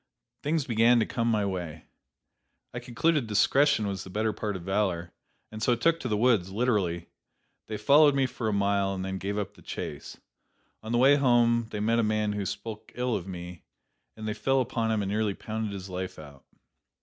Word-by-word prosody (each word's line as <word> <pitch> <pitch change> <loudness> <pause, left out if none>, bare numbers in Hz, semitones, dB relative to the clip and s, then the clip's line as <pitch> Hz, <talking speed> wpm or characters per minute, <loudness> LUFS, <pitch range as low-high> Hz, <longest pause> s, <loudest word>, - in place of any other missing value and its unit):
Things 150 -1 0
began 115 0 +4
to 110 - +2
come 115 -1 -2
my 105 -3 +1
way. 85 -5 -5 0.9
I 125 - -4
concluded 125 +3 0
discretion 110 +4 +3
was 95 -1 -3
the - - -10
better 110 +3 -1
part 105 -1 -3
of 90 - -6
valor, 95 -3 -1 0.4
and 110 0 -8
so 120 +1 +3
took 165 +8 +2
to 130 - -4
the 105 -3 0
woods, 110 -6 +2
literally. 100 -7 0 0.6
They 110 - -4
followed 145 +6 +5
me 135 -1 +3
for 120 -3 -4
a - - +1
mile, 100 -1 +1
and 95 0 -4
then 95 0 -4
gave 100 +2 -3
up 105 -2 -3
the - - -18
chase. - - -7 0.6
On 110 - -7
the 120 - +2
way 135 +4 +6
home 120 -3 +3
they 105 - -5
met 115 +3 +2
a - - +3
man 105 -1 0
who 100 -2 -3
spoke 110 -2 -7
ill 125 -1 0
of 90 - -4
me, 90 -2 -8 0.6
and 110 0 -6
they 105 - -1
fell 135 +4 +1
upon 115 -2 -1
him 110 -2 +1
and 100 - -3
nearly 105 -1 0
pounded 110 -1 -4
his 100 -1 -6
life 95 0 -5
out. 70 -3 -13
110 Hz, 205 wpm, -28 LUFS, 95-120 Hz, 0.9 s, way